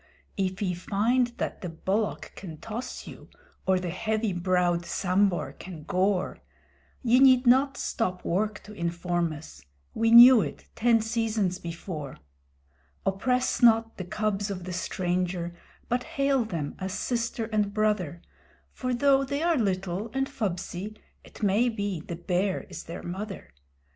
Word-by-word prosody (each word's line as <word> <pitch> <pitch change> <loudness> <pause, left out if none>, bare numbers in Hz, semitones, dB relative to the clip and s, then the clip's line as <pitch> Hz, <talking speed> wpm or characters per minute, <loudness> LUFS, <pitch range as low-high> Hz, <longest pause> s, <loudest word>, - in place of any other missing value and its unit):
If 190 0 -1
ye 180 -2 0
find 220 +8 +1
that - - -3
the 180 - -4
Bullock 195 +6 -2
can 165 -5 -8
toss 225 - -6
you, - - -11 0.4
or 190 -1 +4
the 180 -2 -3
heavy 215 +2 -1
browed 175 -1 +1
Sambhur 185 -2 +1
can 170 -5 -10
gore; 185 +2 0 0.6
Ye 245 +1 +5
need 260 -1 +6
not 270 +3 +4
stop 185 -6 -2
work 210 +3 -1
to 210 - -11
inform 170 -1 -1
us: 75 - -10 0.3
we 225 0 +2
knew 240 +1 +10
it - - -5
ten 230 0 +3
seasons 220 -5 0
before. 165 -4 -6 0.9
Oppress 250 +8 +1
not 225 -1 +5
the 185 - -4
cubs 205 +2 -1
of 185 -3 -5
the 180 0 -5
stranger, 180 -1 -2 0.3
but 245 +1 0
hail 275 -2 +1
them 165 -9 -4
as 190 0 -3
Sister 230 0 -2
and 210 -1 +1
Brother, 205 -6 0 0.5
For 255 -1 -2
though 275 +2 +4
they 280 +3 -2
are 340 -1 +3
little 195 - -1
and 270 0 +1
fubsy, 210 -4 -4 0.3
it - - -12
may 210 +5 +3
be 200 -5 -3
the 170 - -6
Bear 180 +3 0
is - - -7
their 165 - -7
mother. 195 - -6
200 Hz, 150 wpm, -27 LUFS, 180-230 Hz, 0.9 s, knew